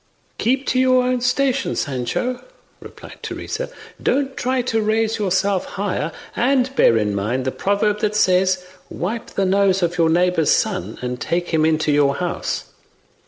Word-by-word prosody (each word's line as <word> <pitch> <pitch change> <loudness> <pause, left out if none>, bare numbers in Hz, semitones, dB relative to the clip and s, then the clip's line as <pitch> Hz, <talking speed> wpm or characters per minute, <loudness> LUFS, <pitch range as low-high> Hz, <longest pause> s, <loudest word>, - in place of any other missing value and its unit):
"Keep 260 +3 +1
to 255 - +2
your 255 -1 +4
own 250 0 0
station, 265 +2 +1
Sancho," 140 - -2 0.4
replied - - -12
Teresa; - - -5 0.3
"don't 270 0 0
try 255 0 0
to 225 -2 0
raise 220 +1 0
yourself 195 -1 +1
higher, 185 -5 -1 0.2
and 260 +1 +1
bear 115 - +5
in 105 -2 0
mind 110 +6 -1
the 130 - 0
proverb 205 +4 0
that 210 0 -1
says, 185 -2 +2 0.2
'wipe 220 +6 -4
the 195 - -1
nose 195 0 +2
of 175 +1 -1
your 165 -1 +4
neigbbour's 175 -1 +2
son, 205 -4 0
and 125 0 -4
take 175 +1 -1
him 160 -2 +2
into 155 -1 +2
your 145 -1 +3
house. 175 +1 -3
195 Hz, 160 wpm, -20 LUFS, 165-245 Hz, 0.4 s, bear